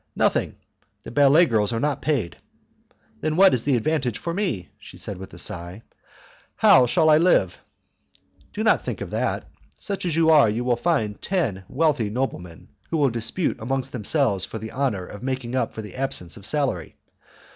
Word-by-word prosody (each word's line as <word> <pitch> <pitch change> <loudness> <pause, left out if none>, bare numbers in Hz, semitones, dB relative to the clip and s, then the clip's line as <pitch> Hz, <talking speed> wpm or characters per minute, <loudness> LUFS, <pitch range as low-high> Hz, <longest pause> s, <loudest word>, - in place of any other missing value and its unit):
"Nothing. - - +1 0.5
The - - -9
ballet 145 +6 +5
girls 110 -7 +1
are 115 - -1
not 145 0 -1
paid." 135 - -1 0.8
"Then 155 +4 -1
where 195 0 +7
is 125 - 0
the 140 -2 +3
advantage 125 -2 0
for 170 - -4
me?" 170 - -2
she - - -13
said, 100 -3 -6
with 95 - -9
a - - -12
sigh; 90 +2 -6 0.7
"how 125 -2 +6
shall 160 +6 +2
I 155 0 +6
live?" 165 - +2 0.9
"Do - - -3
not - - +3
think - - -5
of - - -6
that. - - -2 0.3
Such 200 -1 -4
as 170 -3 0
you 160 -1 +4
are, 145 -8 +6
you 115 +4 -2
will 125 -1 +2
soon - - -19
find 110 -12 0
ten 120 - -2
wealthy 140 -7 +1
noblemen 105 -8 -5 0.2
who 165 - -1
will 140 -4 +2
dispute 115 +9 -2
amongst 130 +2 -2
themselves 115 - 0
for 110 - -4
the 110 0 -7
honour 125 -9 -1
of 100 +3 -10
making 130 -2 -3
up 130 - 0
for 110 - -7
the 105 - -9
absence 130 -10 -3
of 100 -1 -4
salary. 130 - -1
125 Hz, 190 wpm, -23 LUFS, 105-150 Hz, 0.9 s, where